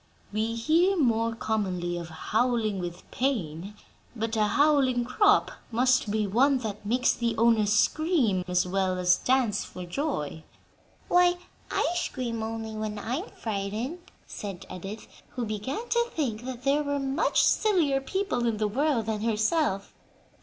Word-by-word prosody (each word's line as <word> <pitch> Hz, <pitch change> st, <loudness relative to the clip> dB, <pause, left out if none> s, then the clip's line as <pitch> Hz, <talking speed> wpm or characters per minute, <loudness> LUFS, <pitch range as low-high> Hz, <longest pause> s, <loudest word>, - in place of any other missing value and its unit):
We 220 Hz, +2 st, -1 dB
hear 335 Hz, +11 st, +3 dB
more 230 Hz, -5 st, +2 dB
commonly 185 Hz, -6 st, -2 dB
of 170 Hz, -1 st, -6 dB
'howling 220 Hz, +4 st, 0 dB
with 175 Hz, -1 st, -6 dB
pain,' 200 Hz, -, -2 dB, 0.4 s
but 225 Hz, 0 st, -2 dB
'a 215 Hz, -1 st, +3 dB
howling 270 Hz, -2 st, +3 dB
crop' 410 Hz, -, +3 dB, 0.2 s
must 250 Hz, -1 st, +2 dB
be 215 Hz, 0 st, 0 dB
one 260 Hz, +8 st, +3 dB
that 210 Hz, -1 st, -5 dB
makes 245 Hz, +5 st, +2 dB
the 235 Hz, -1 st, -2 dB
owner 225 Hz, -2 st, +4 dB
scream, 225 Hz, -, +2 dB
as 180 Hz, 0 st, +2 dB
well 185 Hz, 0 st, 0 dB
as 180 Hz, 0 st, +4 dB
dance 250 Hz, -5 st, +1 dB
for 180 Hz, -, -8 dB
joy." 175 Hz, -, -3 dB, 0.6 s
"Why, 355 Hz, 0 st, +4 dB, 0.3 s
I -, -, +1 dB
scream 250 Hz, -9 st, -3 dB
only 220 Hz, 0 st, -4 dB
when 215 Hz, -1 st, -4 dB
I'm 255 Hz, -, -3 dB
frightened," 220 Hz, -, -4 dB, 0.3 s
said 195 Hz, -4 st, -7 dB
Edith, 195 Hz, +4 st, -7 dB, 0.3 s
who 245 Hz, -2 st, -2 dB
began 225 Hz, -, -4 dB
to 470 Hz, 0 st, +2 dB
think 245 Hz, -7 st, -2 dB
that 255 Hz, -1 st, -6 dB
there 280 Hz, +2 st, +3 dB
were 285 Hz, -1 st, -1 dB
much 275 Hz, +2 st, +1 dB
sillier 330 Hz, -11 st, +3 dB
people 325 Hz, -6 st, -1 dB
in 225 Hz, -2 st, 0 dB
the 215 Hz, 0 st, +1 dB
world 265 Hz, +1 st, +1 dB
than 220 Hz, -1 st, -2 dB
herself. 220 Hz, -, 0 dB
230 Hz, 145 wpm, -27 LUFS, 205-275 Hz, 0.6 s, owner